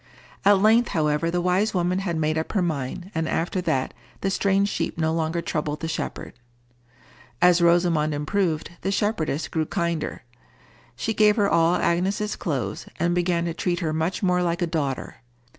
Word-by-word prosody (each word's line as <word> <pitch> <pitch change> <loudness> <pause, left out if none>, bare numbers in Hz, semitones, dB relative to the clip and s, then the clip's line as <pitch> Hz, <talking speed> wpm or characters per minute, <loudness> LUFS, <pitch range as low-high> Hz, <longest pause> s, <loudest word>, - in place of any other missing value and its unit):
At 200 0 +6
length, 225 +4 +4
however, 150 +1 +1
the 175 +1 -1
wise 190 +4 +1
woman 180 +1 +1
had 175 -4 -2
made 155 0 0
up 160 0 -3
her 200 - +2
mind, 160 +3 -3
and 160 -1 -1
after 175 +3 -1
that 130 -7 -1 0.3
the 195 - 0
strange 195 +1 +2
sheep - - -3
no 160 -1 +1
longer 165 +1 -1
troubled 150 -1 -3
the 160 - -2
shepherd. 160 - -4 1.1
As 180 -1 +5
Rosamond 170 -3 +3
improved, 155 +2 -1
the 195 - -1
shepherdess 195 -8 -1
grew 160 -1 -2
kinder. 170 -2 -2 0.7
She 220 - -2
gave 210 -1 +4
her 205 -3 +2
all 170 -1 +3
Agnes's 195 +5 0
clothes, 125 - -3
and 170 +1 +1
began 175 -1 +1
to 170 - -2
treat 175 +1 -1
her 155 -2 -1
much 160 +6 -1
more 180 -1 +2
like 175 0 0
a - - +3
daughter. 150 -5 -3
170 Hz, 175 wpm, -24 LUFS, 160-190 Hz, 1.1 s, At